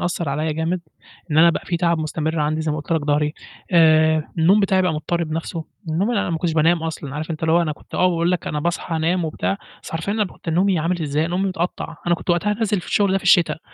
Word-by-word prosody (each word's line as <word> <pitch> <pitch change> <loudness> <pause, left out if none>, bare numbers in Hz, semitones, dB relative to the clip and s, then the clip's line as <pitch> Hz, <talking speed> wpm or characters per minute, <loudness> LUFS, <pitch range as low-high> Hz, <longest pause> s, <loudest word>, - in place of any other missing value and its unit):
أثّر 175 -2 -2
عليَّ 155 +3 -1
جامد، 165 +3 -1 0.5
إن 150 - +2
أنا 170 +1 +7
بقى - - -4
في 175 - 0
تعب 170 -1 +1
مستمر 155 +1 -2
عندي 155 +1 0
زي 160 0 -1
ما - - -2
قُلت 155 +2 -4
لك 160 - +2
ضهري، 150 +1 0 0.4
آآ، 160 -2 +5 0.2
النوم 185 +6 +5
بتاعي 190 -2 +2
بقى 180 -2 +1
مضطرب 165 +1 -2
نفْسُه، 165 0 -4 0.2
النوم 180 +8 0
أنا 205 -7 0
ما 165 - -1
كنتش 170 0 -1
بانام 165 +1 +3
أصلًا، 155 -4 -5
عارف 155 +2 -5
أنت 155 - -5
اللي 160 0 +2
هو 170 +1 +4
أنا 155 - -1
كنت - - -15
آه 185 - +3
باقول 170 0 +1
لك 180 - -1
أنا 150 - -2
باصحى 170 +1 -2
أنام 170 +2 +1
وبتاع، 165 +5 -2 0.2
بس - - -9
حرفيًا 165 +5 -2
أنا 215 0 +1
ب 185 - -8
كنت - - -11
نومي 180 +3 +2
عامل 170 +2 -1
إزاي، 150 +2 0
نومي 185 +3 -1
متقطّع، 180 -3 -3
أنا 175 - +4
كنت 170 - -4
وقتها 205 +5 +1
نازل 210 -3 0
في - - -12
الشغل 200 -2 +2
ده 195 - +2
في - - -14
الشتا، 170 -4 +4
165 Hz, 260 wpm, -21 LUFS, 155-180 Hz, 0.5 s, أنا